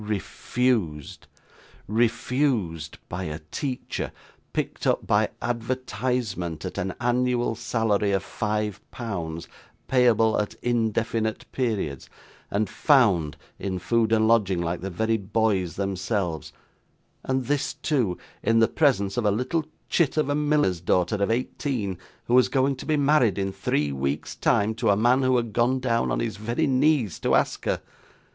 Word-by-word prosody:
Refused! 105 - -1 0.6
refused 115 - 0
by 90 +2 -4
a 75 -1 -4
teacher, 130 -3 -3 0.4
picked - - -2
up - - +1
by - - +2
advertisement, 120 - -2
at 90 +1 -4
an 95 -1 -2
annual 120 -1 +1
salary 110 -2 0
of 95 -2 +1
five 105 -1 -2
pounds 85 -8 -5 0.4
payable 115 -4 +4
at 105 - -5
indefinite 115 -2 0
periods, 105 - -2 0.4
and 105 +1 0
'found' 105 - +3 0.2
in 95 -2 -2
food 110 +4 +1
and 110 -1 +4
lodging 100 -6 +3
like 85 0 -2
the 95 - -3
very 110 +5 0
boys 100 -4 0
themselves; 95 - -2 0.7
and 130 -1 -1
this 145 +1 -1
too 120 - 0 0.2
in 115 - +2
the 115 0 +5
presence 110 -10 +1
of 120 - 0
a - - +5
little 125 +10 0 0.2
chit 160 -3 +1
of 150 -2 +2
a - - +2
miller's 145 - +1
daughter 90 +3 +1
of 100 +1 0
eighteen, 115 -3 -1 0.3
who 120 - -1
was 125 0 +6
going 135 0 +2
to 130 - -9
be 155 -1 +2
married, 140 -8 +3
in 95 -1 -1
three 75 -5 0
weeks' 70 +1 -2
time, 105 +2 +2
to 110 - 0
a 100 - +4
man 120 +5 +4
who 130 -1 +3
had 115 -3 -2
gone 125 +3 +2
down 115 -2 +1
on - - 0
his 115 -2 -3
very 120 +9 -1
knees 135 - +2
to - - +2
ask - - 0
her. - - -1
110 Hz, 150 wpm, -25 LUFS, 95-125 Hz, 0.7 s, was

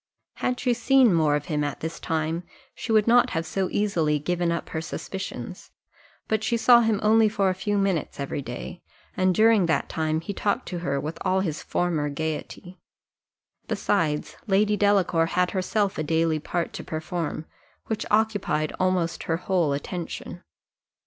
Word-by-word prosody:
Had 250 0 -1
she 250 -2 +2
seen 250 -2 +4
more 155 -3 +3
of 150 0 -2
him 150 -3 -1
at 145 -1 -4
this 160 +1 -4
time, 160 +1 -1 0.3
she - - -5
would 215 -1 +4
not 240 +1 +5
have 165 - -1
so 190 +3 -1
easily 165 -8 +1
given 175 +3 -1
up 170 - -3
her 160 - -3
suspicions; 170 -2 -6 0.6
but 220 0 0
she 235 +1 +1
saw 235 +1 +6
him 220 -3 +1
only 220 0 +5
for 200 -3 +1
a - - -1
few 205 +2 -1
minutes 195 -8 -1
every 140 +1 -3
day, 130 +7 -7 0.3
and 185 -1 +2
during 215 -4 +5
that 160 - 0
time 155 0 -1
he 170 +5 -5
talked 205 +1 -1
to 180 - -4
her 140 -5 -1
with 155 +4 -5
all 190 +1 +1
his 165 -5 -3
former 160 -4 -1
gaiety; 160 +4 -5 0.9
besides, 155 -7 -1
Lady 210 +1 +3
Delacour 195 -5 +3
had 180 +1 +1
herself 195 +1 0
a - - 0
daily 160 0 +1
part 170 +3 -3
to - - -6
perform, 160 0 -4 0.4
which 220 - -3
occupied 205 -8 +1
almost 185 -2 0
her 165 - 0
whole 175 -4 +1
attention. 175 +4 -5
180 Hz, 170 wpm, -25 LUFS, 160-205 Hz, 0.9 s, saw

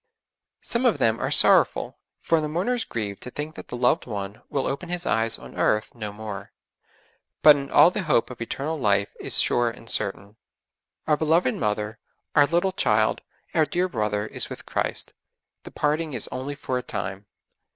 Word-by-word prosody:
Some 245 +2 +1
of 235 - +2
them 115 0 +1
are - - -1
sorrowful, - - +4 0.2
for 165 -1 +2
the 150 - -3
mourners 225 +10 0
grieve 105 - -4
to - - -7
think 150 +4 -6
that - - -10
the 125 - -6
loved 125 +1 +2
one 100 -2 -5
will 135 - -1
open 170 +6 -4
his 175 0 -3
eyes 115 0 +1
on - - -12
earth 105 0 +1
no 105 -3 -5
more; 105 -1 -8 0.9
but 150 -1 +9
in 140 -1 -5
all 175 - +6
the 210 - -2
hope 150 -9 +1
of 120 - -10
eternal 150 +6 -3
life 100 -3 +1
is - - 0
sure 120 -1 +3
and 115 0 -12
certain. 100 0 0 0.7
Our 150 -1 +2
beloved 160 -3 +2
mother, 105 +1 -2 0.4
our 145 -1 +6
little 175 +5 +1
child, 185 - +1 0.3
our 160 - +4
dear 180 +4 0
brother 105 - -1
is - - -2
with - - -9
Christ; - - -2 0.5
the - - -8
parting 150 +1 -1
is 115 - 0
only 130 +3 -5
for 130 -2 -3
a - - -5
time. 100 -4 -5
125 Hz, 180 wpm, -24 LUFS, 105-160 Hz, 0.9 s, but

